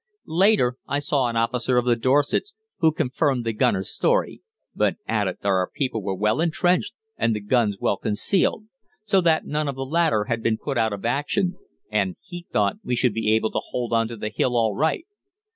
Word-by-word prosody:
Later 170 - +3
I 140 - 0
saw 145 -3 0
an 120 - -3
officer 125 +2 +1
of 125 - +2
the 120 -1 +3
Dorsets, 145 - +1 0.2
who 160 -3 +4
confirmed 140 -4 0
the 115 - -1
gunner's 95 -2 +1
story, - - +1 0.3
but - - +1
added 105 -4 -1
that - - -2
our 95 -2 +2
people 125 -6 -2
were 95 -1 -3
well 105 - +1
entrenched 175 +2 +1 0.2
and 115 - +1
the - - -2
guns 105 -1 +1
well 100 - 0
concealed, 185 - 0 0.4
so 200 -3 +2
that 165 -2 +2
none 150 0 -1
of 140 - -3
the 135 0 -4
latter 155 -6 +2
had 115 +1 -2
been 110 -1 +1
put 140 +3 -4
out 110 -1 +2
of 100 +1 -6
action, 160 +9 0 0.4
and 100 -4 0
he 175 -2 -10
thought 100 -2 +1
we 125 - -1
should 120 -2 +2
be 110 0 0
able 110 0 0
to - - -1
hold 120 -2 -3
on 115 0 +2
to 115 0 -8
the 105 - -3
hill 125 -1 +1
all 110 -3 +1
right. 160 - 0
125 Hz, 205 wpm, -23 LUFS, 110-155 Hz, 0.4 s, who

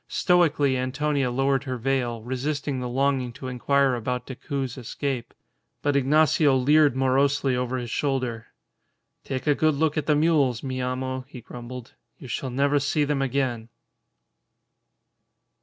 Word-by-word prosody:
Stoically 155 -7 +2
Antonia 135 +1 0
lowered 135 +2 +1
her 130 -2 -3
veil, 120 -2 -1
resisting 135 +2 -2
the 125 -1 -4
longing 135 -1 0
to 130 - -8
inquire 135 +2 +2
about 125 +1 -3
Decoud's 135 -1 -4
escape. 130 0 -4 0.5
But 145 -1 +1
Ignacio 145 +1 +4
leered 145 +2 +4
morosely 135 +1 +2
over 125 +1 -1
his 120 -2 -5
shoulder. 130 -5 -2 0.8
"Take 130 -1 -4
a 150 - +4
good 155 +1 +2
look 155 +1 0
at 150 - -6
the 150 - +4
mules, 145 -6 +2
mi 130 -1 -3
amo," 130 +1 -2
he 135 -2 -10
grumbled. 120 +1 -9 0.2
"You 130 - -11
shall 130 +3 -3
never 140 +3 +2
see 145 +2 +1
them 145 -1 0
again!" 130 -4 -1
135 Hz, 140 wpm, -25 LUFS, 125-145 Hz, 0.8 s, Ignacio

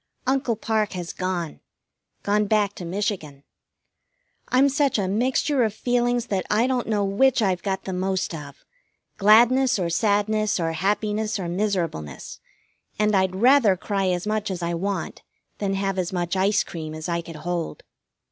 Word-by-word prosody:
Uncle 260 -3 +1
Parke 215 -1 -1
has 175 -2 -5
gone. 180 -4 -3 0.6
Gone 210 +1 +2
back 205 -1 +2
to 180 - -8
Michigan. 170 -7 -3 1.0
I'm 260 +2 +4
such 280 -2 +1
a 195 -3 0
mixture 255 - +1
of 215 -2 -1
feelings 245 0 0
that 195 -5 -1
I 220 +3 +3
don't 255 -2 -1
know 210 -2 +1
which 255 +7 +3
I've 185 -3 +1
got 190 0 -2
the 190 - -4
most 190 0 -1
of, 145 -3 -9 0.5
gladness 240 +5 +5
or 175 -3 -1
sadness 210 +2 +1
or 165 -1 0
happiness 210 +5 -1
or 185 -3 -4
miserableness, 175 - -3 0.6
and 210 0 +2
I'd 190 -1 +2
rather 235 -2 +5
cry 195 0 -1
as 180 0 -1
much 215 0 -1
as 180 -2 -4
I 170 0 -1
want 195 +3 -3 0.4
than 195 -1 -1
have 195 -1 -1
as 180 -1 -2
much 175 -1 -2
ice 200 +2 +2
cream 155 -2 -7
as 155 +1 -6
I 170 -1 -1
could 165 -1 -10
hold. 170 +1 -4
200 Hz, 165 wpm, -24 LUFS, 180-215 Hz, 1.0 s, gladness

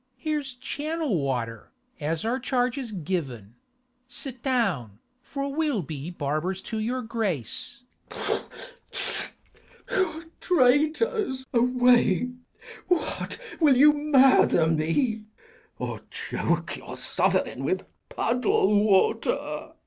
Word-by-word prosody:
Mat. 255 - -47 0.2
Here's 295 -4 -2
channel 290 - -2
water, 120 -5 -3 0.3
as 160 +4 -2
our 245 +3 0
charge 250 -1 0
is 260 -5 -5
given: 145 - -4 0.5
Sit 250 0 -5
down, 195 - 0 0.2
for 275 +1 -4
we'll 295 - 0
be 150 +1 -6
barbers 175 +4 -2
to 220 - -4
your 245 +4 -1
grace. 220 - -3 0.3
K. - - -1 1.5
Edw. 335 -8 0 0.2
Traitors, 305 - +2
away! 245 -3 +4 0.6
what, 355 -2 -1 0.2
will 290 -6 +5
you 295 +3 +8
murder 270 - +5
me, 165 - +1 0.5
Of - - -6
choke - - -2
your - - -9
sovereign - - 0
with - - -1 0.2
puddle 210 -4 +2
water? 195 -3 +3
_Gur. - - -3
245 Hz, 105 wpm, -26 LUFS, 175-275 Hz, 1.5 s, you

